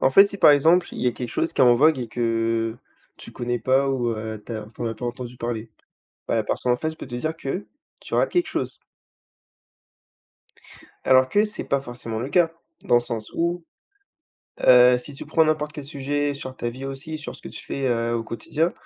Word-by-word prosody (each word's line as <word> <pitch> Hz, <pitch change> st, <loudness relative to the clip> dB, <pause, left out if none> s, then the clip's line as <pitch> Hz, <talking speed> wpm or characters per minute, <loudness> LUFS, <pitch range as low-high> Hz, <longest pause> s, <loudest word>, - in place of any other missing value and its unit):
En 130 Hz, -, +4 dB
fait, 195 Hz, +8 st, +8 dB
si 200 Hz, 0 st, -7 dB
par -, -, +8 dB
exemple, 160 Hz, +5 st, +4 dB
il -, -, -5 dB
y 125 Hz, -, +1 dB
a 120 Hz, -, +3 dB
quelque 120 Hz, 0 st, -5 dB
chose 165 Hz, -, -1 dB
qui -, -, -2 dB
est 130 Hz, -, +8 dB
en 120 Hz, -, +7 dB
vogue 150 Hz, +3 st, +4 dB
et 120 Hz, -, -4 dB
que, 115 Hz, -1 st, 0 dB, 0.4 s
tu -, -, -9 dB
connais 120 Hz, 0 st, -2 dB
pas, 135 Hz, +2 st, +2 dB
ou, 125 Hz, -3 st, 0 dB
heu, 110 Hz, -1 st, -4 dB
tu -, -, -7 dB
as 110 Hz, -1 st, -5 dB
tu -, -, -16 dB
en -, -, -1 dB
as 115 Hz, -, -2 dB
pas 125 Hz, -, -7 dB
entendu 120 Hz, 0 st, -5 dB
parler, 115 Hz, -2 st, -4 dB, 0.6 s
bah, -, -, +1 dB
la 110 Hz, -, +2 dB
personne 125 Hz, +3 st, 0 dB
en 125 Hz, -, +2 dB
face 160 Hz, +4 st, -3 dB
peut 160 Hz, -, -9 dB
te 125 Hz, -, -8 dB
dire 155 Hz, +6 st, -2 dB
que 165 Hz, +6 st, -4 dB, 0.3 s
tu -, -, -6 dB
rates -, -, +2 dB
quelque 355 Hz, 0 st, +2 dB
chose -, -, -3 dB, 2.3 s
alors 130 Hz, 0 st, +5 dB
que 205 Hz, +7 st, +3 dB
c'est 210 Hz, -1 st, -4 dB
pas 140 Hz, -, 0 dB
forcément 120 Hz, -3 st, -6 dB
le 125 Hz, -, -3 dB
cas, 165 Hz, +2 st, +3 dB, 0.3 s
dans 120 Hz, -, +4 dB
le -, -, +5 dB
sens 115 Hz, -3 st, -5 dB
où, 170 Hz, +1 st, -1 dB, 1.0 s
heu, 125 Hz, 0 st, +7 dB
si 140 Hz, +3 st, -7 dB
tu -, -, -7 dB
prends 160 Hz, +1 st, +3 dB
n'importe 155 Hz, -1 st, 0 dB
quel 145 Hz, -2 st, -7 dB
sujet 145 Hz, 0 st, -2 dB
sur 130 Hz, -1 st, -6 dB
ta 120 Hz, -, -3 dB
vie 130 Hz, +3 st, -7 dB
aussi, 135 Hz, +4 st, -5 dB
sur 150 Hz, -, -7 dB
ce -, -, -10 dB
que -, -, -7 dB
tu -, -, -7 dB
fais, 135 Hz, -1 st, -2 dB
heu, 115 Hz, -1 st, 0 dB
au 115 Hz, -, -1 dB
quotidien, 155 Hz, +9 st, -1 dB
130 Hz, 230 wpm, -24 LUFS, 120-150 Hz, 2.3 s, fait